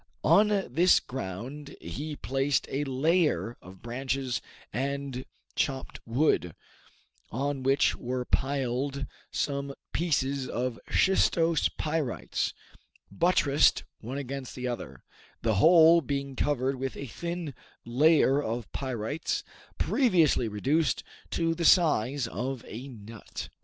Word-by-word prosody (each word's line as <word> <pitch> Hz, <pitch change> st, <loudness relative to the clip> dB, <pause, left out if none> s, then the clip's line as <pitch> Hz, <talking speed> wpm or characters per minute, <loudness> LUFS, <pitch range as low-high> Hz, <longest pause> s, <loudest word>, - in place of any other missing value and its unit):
On 210 Hz, +1 st, +6 dB
this 185 Hz, -, +3 dB
ground 130 Hz, +6 st, -6 dB
he 145 Hz, -, -5 dB
placed 135 Hz, 0 st, 0 dB
a 140 Hz, +2 st, 0 dB
layer 135 Hz, -, +1 dB
of 95 Hz, 0 st, -14 dB
branches 125 Hz, -1 st, -2 dB, 0.3 s
and 135 Hz, -1 st, -3 dB, 0.3 s
chopped 135 Hz, -1 st, -2 dB
wood, 115 Hz, -, +1 dB, 0.7 s
on 140 Hz, +3 st, -2 dB
which 135 Hz, +1 st, +3 dB
were 125 Hz, +1 st, -3 dB
piled 135 Hz, +1 st, -1 dB, 0.2 s
some 140 Hz, -1 st, -2 dB, 0.2 s
pieces 140 Hz, -5 st, 0 dB
of 125 Hz, -1 st, -2 dB
shistose 170 Hz, -4 st, +3 dB
pyrites, 155 Hz, -5 st, -1 dB, 0.6 s
buttressed 145 Hz, -, +3 dB, 0.2 s
one 125 Hz, +5 st, -5 dB
against 135 Hz, -1 st, -5 dB
the 125 Hz, 0 st, -3 dB
other, 120 Hz, -1 st, -6 dB, 0.4 s
the 110 Hz, -3 st, +2 dB
whole 165 Hz, 0 st, +7 dB
being 140 Hz, -1 st, -3 dB
covered 135 Hz, -1 st, 0 dB
with 135 Hz, 0 st, -4 dB
a 140 Hz, -, -5 dB
thin 170 Hz, +3 st, -5 dB, 0.3 s
layer 145 Hz, +3 st, +4 dB
of 115 Hz, -3 st, -4 dB
pyrites, 130 Hz, +3 st, -2 dB, 0.3 s
previously 170 Hz, -, +3 dB
reduced 135 Hz, +10 st, +1 dB, 0.3 s
to 165 Hz, -1 st, 0 dB
the 170 Hz, +1 st, -3 dB
size 145 Hz, -, +4 dB
of 125 Hz, +3 st, -4 dB
a 125 Hz, +5 st, -7 dB
nut. 115 Hz, -3 st, -9 dB
135 Hz, 110 wpm, -28 LUFS, 125-150 Hz, 0.7 s, whole